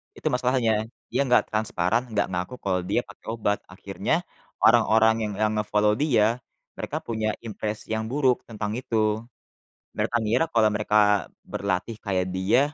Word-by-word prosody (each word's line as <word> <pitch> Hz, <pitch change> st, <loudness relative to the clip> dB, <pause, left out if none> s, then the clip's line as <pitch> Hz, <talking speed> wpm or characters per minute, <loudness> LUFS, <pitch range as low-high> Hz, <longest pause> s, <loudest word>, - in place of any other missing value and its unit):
Itu -, -, -4 dB
masalahnya. 120 Hz, -4 st, +1 dB, 0.2 s
Dia 125 Hz, +4 st, +1 dB
nggak 125 Hz, -, +5 dB
transparan, 110 Hz, +1 st, 0 dB
nggak 100 Hz, -2 st, +1 dB
ngaku 90 Hz, +7 st, -3 dB
kalau 95 Hz, -2 st, +1 dB
dia 100 Hz, -, +1 dB
pakai -, -, -16 dB
obat, 105 Hz, -3 st, 0 dB
akhirnya -, -, -2 dB, 0.4 s
orang-orang 110 Hz, 0 st, +5 dB
yang 105 Hz, -, -5 dB
yang 110 Hz, 0 st, +3 dB
nge-follow 105 Hz, 0 st, +2 dB
dia 115 Hz, -5 st, +3 dB, 0.4 s
mereka -, -, -4 dB
punya 110 Hz, -2 st, -1 dB, 0.2 s
impres 105 Hz, 0 st, -5 dB
yang 110 Hz, 0 st, 0 dB
buruk 130 Hz, -3 st, +2 dB
tentang 105 Hz, -2 st, -4 dB
itu. 120 Hz, -3 st, -4 dB, 1.0 s
Mereka 120 Hz, -, -1 dB
ngira 115 Hz, +9 st, +2 dB
kalau 110 Hz, -2 st, +5 dB
mereka 105 Hz, -2 st, +3 dB, 0.2 s
berlatih 95 Hz, +3 st, -2 dB
kayak 95 Hz, -2 st, 0 dB
dia, 95 Hz, +7 st, +3 dB
110 Hz, 145 wpm, -25 LUFS, 105-115 Hz, 1.0 s, nggak